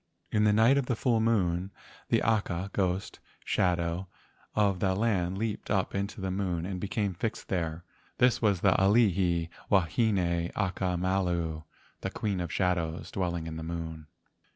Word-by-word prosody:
In 105 0 +3
the 105 - +5
night 115 +6 +5
of 130 - -3
the 125 - +1
full 115 0 +2
moon, 95 -5 +1 0.4
the - - +3
aka 100 -4 0
(ghost) 95 -1 -1 0.3
shadow 85 0 0 0.5
of 100 -3 +2
that 95 0 +1
land 95 -5 +1
leaped 110 0 -3
up 95 -2 +1
into 100 +1 -3
the 95 -1 -2
moon 90 -3 -1
and 95 -1 -4
became 100 -2 -1
fixed 110 +5 -4
there. 85 -2 -2 0.3
This 125 -2 +3
was 100 -6 +2
the 100 - +5
Alii 95 -5 +3 0.2
wahine 90 -2 +2
aka 95 -2 0
malu 85 -3 0 0.4
(the - - -2
queen 100 -4 -2
of 85 -3 -4
shadows), 85 -3 -1
dwelling 85 -3 -2
in 80 -1 -5
the 80 - -5
moon. 80 -2 -5
95 Hz, 155 wpm, -29 LUFS, 85-105 Hz, 0.5 s, the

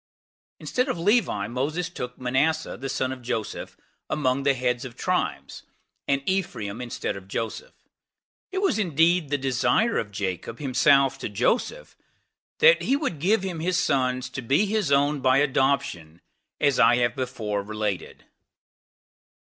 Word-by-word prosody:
Instead 255 +2 -1
of 255 - -1
Levi, 175 - +2
Moses 145 +9 -2
took 125 -7 -7
Manasseh, 140 +6 0
the 135 +2 -6
son 130 0 -1
of 130 -1 -7
Joseph, 115 -3 -4 0.3
among 135 -2 0
the 140 0 +2
heads 125 -1 -1
of 125 -3 -8
tribes; - - -2 0.5
and 140 0 +1
Ephraim 120 - -2
instead 120 -1 -4
of 95 -1 -10
Joseph. 115 - -5 0.8
It 385 +1 -2
was 220 - +2
indeed 170 -3 +2
the 145 - +1
desire 135 - +1
of 105 - -4
Jacob 100 +3 -4
himself 135 0 +3
to - - -4
Joseph, 225 - -1 0.6
that 480 +1 +6
he 270 - +1
would 280 - -2
give 195 +6 +2
him 180 -4 -4
his 175 +2 0
sons 130 -7 +1
to 130 - -5
be 135 - +2
his 205 -7 -1
own 145 +1 +3
by 130 0 +4
adoption, 135 - 0 0.4
as 140 -3 +2
I 120 - +6
have 120 -1 +1
before 115 -6 -3
related. 105 -1 -4
135 Hz, 150 wpm, -25 LUFS, 120-170 Hz, 0.8 s, that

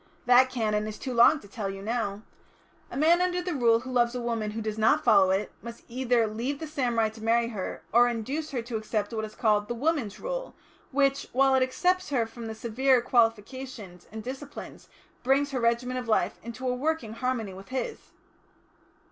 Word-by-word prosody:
That 250 +1 +6
Canon 215 -4 -1
is 215 -1 -6
too 260 - -5
long 240 +6 +6
to 200 - -14
tell 200 -1 -4
you 195 0 -7
now. 215 -2 -2 0.7
A - - -6
man 330 +4 +4
under 360 0 +1
the 360 0 -3
Rule 235 -4 +3
who 255 +1 -7
loves 240 -1 +2
a - - -2
woman 230 -3 -2
who 215 +2 -5
does 215 0 -3
not 220 - +3
follow 195 -3 +5
it, 190 +2 0
must 235 0 -9
either 245 -1 +1
leave 235 +6 -3
the 320 - -6
samurai 245 -7 0
to 220 0 -13
marry 230 +1 +2
her, 195 -7 -5
or 240 +1 +6
induce 260 +7 -3
her 250 -5 -3
to 235 -1 -3
accept 215 0 -2
what 220 -1 -2
is 215 - -11
called 210 -3 +2
the 240 - -3
Woman's 275 -5 -1
Rule, - - -5 0.3
which, 275 0 +1
while 270 +1 +4
it 265 - +4
excepts 360 +8 +1
her 250 -5 +1
from 225 0 -8
the 220 - -5
severer 245 +4 +2
qualifications 230 -4 -1
and 220 0 -7
disciplines, 265 +4 -8 0.3
brings 275 +3 +2
her 260 - -1
regimen 235 +2 +1
of 250 -2 -4
life 220 - +1
into 235 +3 -6
a 250 - +1
working 265 -4 -2
harmony 230 -4 -2
with 195 +1 -12
his." 265 - -4
240 Hz, 200 wpm, -27 LUFS, 220-265 Hz, 0.7 s, That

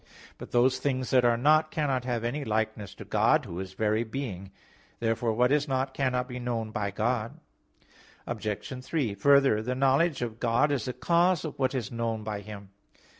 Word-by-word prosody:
But - - -9
those 125 +2 +3
things 130 -3 -1
that 125 -1 +5
are 120 -1 +3
not 155 +5 +4
cannot 135 -6 -1
have 120 -3 -2
any 135 +5 -2
likeness 110 -3 -2
to - - -10
God, - - +2
Who 85 - -6
is 95 0 -6
very 110 +2 +1
being. 110 -6 -5 0.5
Therefore 115 0 0
what 125 +3 +2
is 150 0 +2
not, 135 0 -1
cannot 125 -2 0
be 125 -1 -6
known 115 -3 -3
by 105 -2 -2
God. 110 +2 -2 0.9
Obj. 120 +3 -4
3: 130 -7 -1
Further, 135 0 +4
the 125 +3 -2
knowledge 135 +2 +2
of 115 -1 -5
God 125 +5 +2
is 135 -6 -1
the 125 - -3
cause 170 +2 +2
of 155 - -7
what 130 0 +1
is 120 -5 -3
known 115 -2 -2
by 105 -1 -4
Him. 100 -1 -10
125 Hz, 185 wpm, -28 LUFS, 110-135 Hz, 0.9 s, that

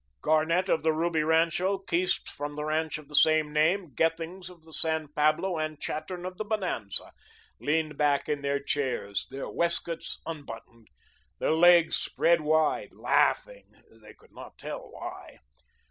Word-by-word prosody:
Garnett 160 +4 +2
of 165 - +2
the 160 0 +2
Ruby 165 0 +1
rancho, 165 +5 +2
Keast 185 -1 -1
from 145 0 -6
the 150 0 -3
ranch 155 +1 -1
of 155 -2 -13
the 150 - -5
same 155 0 +4
name, 160 +1 +2
Gethings 165 +5 -1
of 175 -3 -16
the 160 0 -15
San 160 -2 -1
Pablo, 155 +4 +1
and 155 -1 -3
Chattern 175 +4 -5
of 185 0 -7
the - - 0
Bonanza, 190 - -3 0.5
leaned 155 0 -1
back 145 -1 +2
in 145 -1 -1
their 140 0 0
chairs, 130 -8 -2
their 135 +1 -6
waist 170 0 +1
coats 165 -1 -5
unbuttoned, 115 -7 -9 0.5
their - - 0
legs 170 0 +6
spread 170 -1 +2
wide, 155 0 +1
laughing - - +1 0.3
they 105 0 -14
could - - -23
not - - -11
tell - - -7
why. - - -9
160 Hz, 160 wpm, -28 LUFS, 150-170 Hz, 0.5 s, legs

